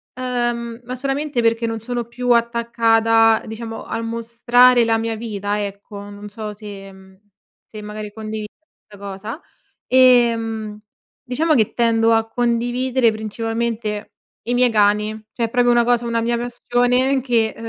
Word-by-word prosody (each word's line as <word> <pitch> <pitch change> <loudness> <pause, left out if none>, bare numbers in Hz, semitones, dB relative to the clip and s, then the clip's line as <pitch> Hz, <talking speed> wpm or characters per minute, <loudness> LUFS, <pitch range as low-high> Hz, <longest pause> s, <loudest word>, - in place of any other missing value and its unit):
uhm, 240 -2 -3
ma 250 +1 -6
solamente 275 0 -2
perché 230 0 +1
non 225 -1 -3
sono 240 +1 -3
più 245 +2 -5
attaccata, 230 -1 +3
diciamo, 225 0 -7
al 230 - -4
mostrare 235 +2 +3
la 225 0 +2
mia 225 0 -2
vita, 210 -2 -3
ecco. 200 0 -8
Non 205 0 -10
so 210 0 -6
se 200 -2 -10
mhmm, 190 0 -17 0.5
se 215 - -10
magari 210 0 -7
condividi 215 -1 -5 0.4
la 205 - -12
cosa. 200 - -7 0.5
Ehm, 230 -4 +3 0.5
diciamo 310 +6 +1
che 220 -4 +2
tendo 230 -1 +3
a 225 0 +2
condividere 245 +1 +1
principalmente 220 0 -3 0.4
i 240 - -1
miei 250 0 +4
cani. 210 -1 +2 0.2
Cioè 235 - -1
è - - -5
proprio 245 +1 +3
una 240 -1 +3
cosa 240 0 +2
una 230 0 0
mia 235 +1 0
passione 245 +2 +1
che, 235 -3 +1
230 Hz, 145 wpm, -20 LUFS, 215-245 Hz, 0.5 s, miei